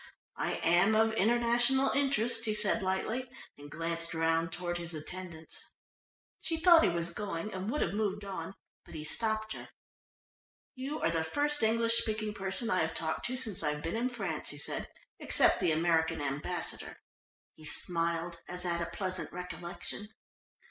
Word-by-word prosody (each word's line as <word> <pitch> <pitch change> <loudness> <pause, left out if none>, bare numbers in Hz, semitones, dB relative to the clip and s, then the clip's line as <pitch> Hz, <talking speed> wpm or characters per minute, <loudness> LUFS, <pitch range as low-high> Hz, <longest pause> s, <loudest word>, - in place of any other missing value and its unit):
"I - - 0
am 175 +6 +4
of 220 0 +4
international 240 +5 +3
interest," 245 -4 +3
he 215 -1 +2
said 210 +1 +3
lightly 220 +7 -1 0.3
and 145 0 -12
glanced 165 +1 -3
round 165 0 +1
toward 175 0 -3
his 170 -1 -1
attendants. 160 0 -6 0.8
She 325 - -1
thought 340 -1 +8
he - - +4
was 170 0 -2
going 205 0 -4
and 190 +2 -3
would 300 - -1
have - - -2
moved 205 -1 -1
on, 190 -1 -5 0.3
but - - -13
he 155 - -5
stopped 220 +7 -1
her. - - -9 1.0
"You 275 +4 -4
are 165 - +2
the 165 -1 0
first 295 - 0
English 230 +1 +4
speaking 215 -1 -2
person 195 +4 -1
I 185 - +3
have 160 0 0
talked 160 -1 -2
to 255 +1 -3
since 225 -7 +2
I've 150 -1 0
been 165 - -2
in 240 +3 0
France," 195 -11 -3
he 145 - -2
said, - - -1 0.3
"except - - +4
the - - +2
American 160 0 +2
Ambassador." 145 0 -3 0.6
He 155 - -16
smiled 170 +2 -1
as 180 0 -5
at 170 -1 0
a 170 - -1
pleasant 185 -2 -2
recollection. 180 +3 -6
185 Hz, 165 wpm, -32 LUFS, 165-225 Hz, 1.0 s, thought